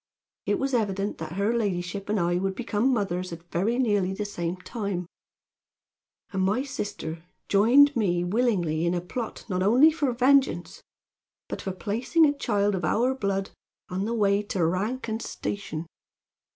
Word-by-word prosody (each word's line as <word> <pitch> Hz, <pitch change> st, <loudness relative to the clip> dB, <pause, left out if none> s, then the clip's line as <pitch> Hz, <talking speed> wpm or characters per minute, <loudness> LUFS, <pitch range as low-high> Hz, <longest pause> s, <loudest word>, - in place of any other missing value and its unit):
It -, -, +2 dB
was 270 Hz, 0 st, -2 dB
evident 205 Hz, -3 st, -1 dB
that 160 Hz, 0 st, -5 dB
her 200 Hz, +5 st, +1 dB
ladyship 195 Hz, -3 st, -2 dB
and 210 Hz, -1 st, +1 dB
I 175 Hz, 0 st, +1 dB
would 190 Hz, +1 st, -1 dB
become 230 Hz, +2 st, 0 dB
mothers 185 Hz, -6 st, -1 dB
at 170 Hz, 0 st, -8 dB
very 210 Hz, +8 st, +1 dB
nearly 205 Hz, -7 st, +1 dB
the 210 Hz, -, -3 dB
same 175 Hz, -3 st, -3 dB
time; 200 Hz, -2 st, -4 dB, 1.3 s
and 190 Hz, -, 0 dB
my 205 Hz, +7 st, +1 dB
sister 170 Hz, -, -5 dB, 0.3 s
joined 260 Hz, +8 st, +6 dB
me 175 Hz, -6 st, +1 dB
willingly 175 Hz, -6 st, +1 dB
in 175 Hz, -, +1 dB
a -, -, +1 dB
plot 225 Hz, +6 st, -6 dB
not 185 Hz, -3 st, -1 dB
only 250 Hz, +11 st, +6 dB
for 295 Hz, -5 st, 0 dB
vengeance, 255 Hz, -7 st, +2 dB, 0.7 s
but -, -, -5 dB
for 195 Hz, -, -3 dB
placing 230 Hz, -, +2 dB
a 290 Hz, -, +3 dB
child 205 Hz, -7 st, 0 dB
of 190 Hz, -2 st, -2 dB
our 240 Hz, +11 st, +2 dB
blood 195 Hz, -6 st, -2 dB, 0.4 s
on 185 Hz, +2 st, -2 dB
the 230 Hz, +2 st, -1 dB
way 200 Hz, -2 st, +3 dB
to 195 Hz, -4 st, -1 dB
rank 210 Hz, +10 st, -1 dB
and 220 Hz, 0 st, -2 dB
station. 175 Hz, -5 st, -4 dB
200 Hz, 165 wpm, -26 LUFS, 180-235 Hz, 1.3 s, joined